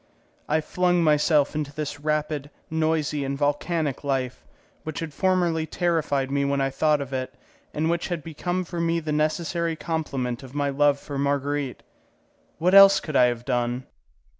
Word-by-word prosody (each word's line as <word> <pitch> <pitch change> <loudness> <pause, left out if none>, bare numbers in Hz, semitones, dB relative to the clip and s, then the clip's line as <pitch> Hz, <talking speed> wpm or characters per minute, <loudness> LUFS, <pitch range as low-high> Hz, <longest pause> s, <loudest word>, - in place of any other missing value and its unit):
I 155 +1 +2
flung 175 +2 +1
myself 150 -1 +3
into 150 -2 -3
this 145 -1 -5
rapid, 150 -1 -2 0.2
noisy, 155 -2 0
and 140 0 -3
volcanic 145 0 -1
life, 130 -3 -2 0.4
which 155 -2 -6
had 165 -3 -5
formerly 175 -4 +1
terrified 155 -7 0
me 140 0 +1
when 140 0 0
I 135 0 0
thought 150 +2 +2
of 135 -1 -6
it, 130 -1 -3 0.4
and 155 +2 -1
which 170 +1 0
had 175 -4 -3
become 175 +4 -3
for 170 -1 -4
me 170 0 +1
the 155 -2 -4
necessary 165 +2 0
complement 140 -7 -3
of 135 0 -12
my 145 -1 0
love 145 0 +3
for 140 -1 -6
Marguerite. 140 -1 -1 0.7
What 180 +3 +1
else 195 0 +9
could 155 - -6
I 125 - +6
have 120 -1 -1
done? 125 0 -1
150 Hz, 165 wpm, -25 LUFS, 140-165 Hz, 0.7 s, else